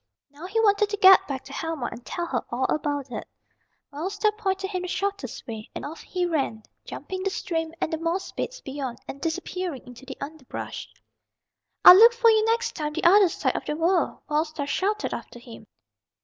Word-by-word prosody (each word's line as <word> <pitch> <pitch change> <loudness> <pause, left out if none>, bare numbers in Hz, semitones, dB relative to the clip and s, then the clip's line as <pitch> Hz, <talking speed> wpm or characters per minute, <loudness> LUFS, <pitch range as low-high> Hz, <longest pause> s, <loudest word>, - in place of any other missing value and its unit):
Now 300 +5 -9
he 435 +4 -1
wanted 410 -1 +3
to 415 - -3
get 385 -1 +7
back 270 -2 -4
to - - -11
Helma 325 -6 -3
and 240 - -10
tell 345 +6 -4
her 260 -8 -2
all 250 +2 -1
about 285 -3 -3
it. 220 - -6 0.7
Wild 325 +7 -3
Star 425 +1 +1
pointed 385 -2 -2
him 365 -2 -2
the 360 - -4
shortest 400 +2 -3
way, 220 -3 -7
and - - -5
off 310 +3 -8
he 360 -1 -2
ran, 275 -10 -1 0.2
jumping 375 0 -6
the 390 - 0
stream 325 -4 -3
and 320 - -2
the 320 - -1
moss 335 +3 -2
beds - - -5
beyond, 265 -3 -5
and 275 - -8
disappearing 345 -2 -4
into 250 +1 -13
the 265 - -7
underbrush. 285 -2 -7 1.0
"I'll - - +13
look 465 +3 +8
for 465 -1 +5
you 435 -1 +4
next 460 +1 0
time 300 -2 -3
the 335 - -3
other 385 +2 +6
side - - -1
of - - -3
the 300 - -2
world!" 335 +1 +1
Wild 305 +2 +1
Star 305 -2 -5
shouted 400 +8 -1
after - - -7
him. 235 -3 -13
330 Hz, 205 wpm, -25 LUFS, 285-390 Hz, 1.0 s, I'll